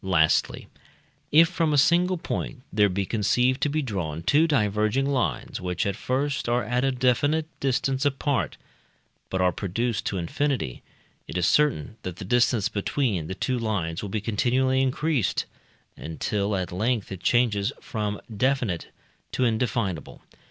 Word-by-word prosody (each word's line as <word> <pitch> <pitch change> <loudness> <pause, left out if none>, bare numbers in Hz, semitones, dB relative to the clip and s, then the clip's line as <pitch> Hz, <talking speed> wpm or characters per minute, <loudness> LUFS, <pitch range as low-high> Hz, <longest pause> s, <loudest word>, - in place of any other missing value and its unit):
Lastly, 80 -5 +2 0.6
if 165 +3 +7
from 165 -2 0
a - - +3
single 175 +6 +4
point 140 -4 -4
there 105 0 +4
be 95 +1 -1
conceived 125 +5 +1
to 150 - +2
be 155 +1 0
drawn 85 - -3
two 150 - +4
diverging 110 -1 +1
lines 135 -3 -1
which 90 -1 -2
at 100 - -1
first 140 0 -1
are 120 +1 +2
at 125 +1 0
a 135 - +2
definite 130 +5 +2
distance 135 0 0
apart, 140 -2 0 0.7
but 95 - -1
are 90 0 +4
produced 105 +5 -2
to 100 - -1
infinity, 95 - -2 0.5
it 90 - -4
is 90 - +2
certain 115 - +2
that 90 -2 -5
the 95 - -8
distance 120 -1 +2
between 100 - -1
the 95 - -4
two 130 +4 -1
lines 95 -8 -2
will 105 - -5
be 105 +2 -2
continually 130 +5 +1
increased, 135 - 0 0.5
until 100 +6 -2
at 95 -2 -2
length 110 +3 -1
it 95 -2 -6
changes 115 -2 +2
from 105 -2 -3 0.2
definite 125 -7 0 0.4
to 130 - 0
indefinable. 110 - -1
115 Hz, 150 wpm, -25 LUFS, 95-135 Hz, 0.7 s, if